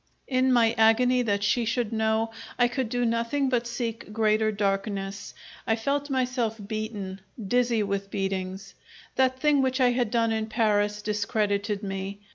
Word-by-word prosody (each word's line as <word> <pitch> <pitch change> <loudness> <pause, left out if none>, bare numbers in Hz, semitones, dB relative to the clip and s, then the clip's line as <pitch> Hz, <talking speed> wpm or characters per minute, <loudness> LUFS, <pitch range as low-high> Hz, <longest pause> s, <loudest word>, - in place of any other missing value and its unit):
In 260 0 +2
my 230 -2 +4
agony 250 +3 +4
that 200 -4 0
she 220 +4 +2
should 235 -1 -1
know, 220 0 +1 0.3
I 245 - +4
could 250 -1 -2
do 245 +1 0
nothing 235 +4 0
but 240 -2 0
seek 235 -2 -4
greater 215 0 +2
darkness. 195 -1 -2 0.3
I 225 - +3
felt 280 +5 -1
myself 250 -4 -1
beaten, 210 -3 -5 0.2
dizzy 235 +1 +1
with 200 0 -3
beatings. 195 -1 -3 0.4
That 260 0 +2
thing 295 -1 +3
which 260 0 0
I 250 -1 +4
had 245 -2 0
done 230 0 +1
in 220 0 -1
Paris 210 -2 +1
discredited 210 -1 -1
me. 195 0 -4
225 Hz, 155 wpm, -26 LUFS, 205-245 Hz, 0.4 s, my